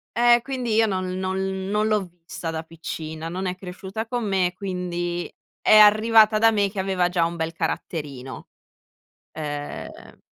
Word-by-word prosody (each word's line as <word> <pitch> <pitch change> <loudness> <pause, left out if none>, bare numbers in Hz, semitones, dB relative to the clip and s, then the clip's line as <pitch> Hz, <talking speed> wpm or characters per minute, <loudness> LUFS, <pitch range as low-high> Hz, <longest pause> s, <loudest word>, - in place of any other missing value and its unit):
eh 240 0 +5
quindi 255 -4 -3
io 225 0 +5
non 185 -3 -1
non 190 0 -2
non 210 +1 +1
l'ho 210 -3 +1 0.2
vista 165 0 -5
da 160 0 -4
piccina, 160 0 -6
non 185 +2 -4
è 180 - -2
cresciuta 190 +4 -6
con 240 -3 -2
me, 185 -2 +1
quindi 175 -2 -4 0.3
è 215 - +6
arrivata 215 +1 +6
da 225 +1 +5
me 205 -2 +1
che 195 -1 -6
aveva 190 -2 +1
già 175 -2 +1
un 170 +1 -3
bel 160 +1 -2
caratterino, 140 -6 -5 0.8
ehm 145 -2 -7
190 Hz, 155 wpm, -24 LUFS, 170-215 Hz, 0.8 s, è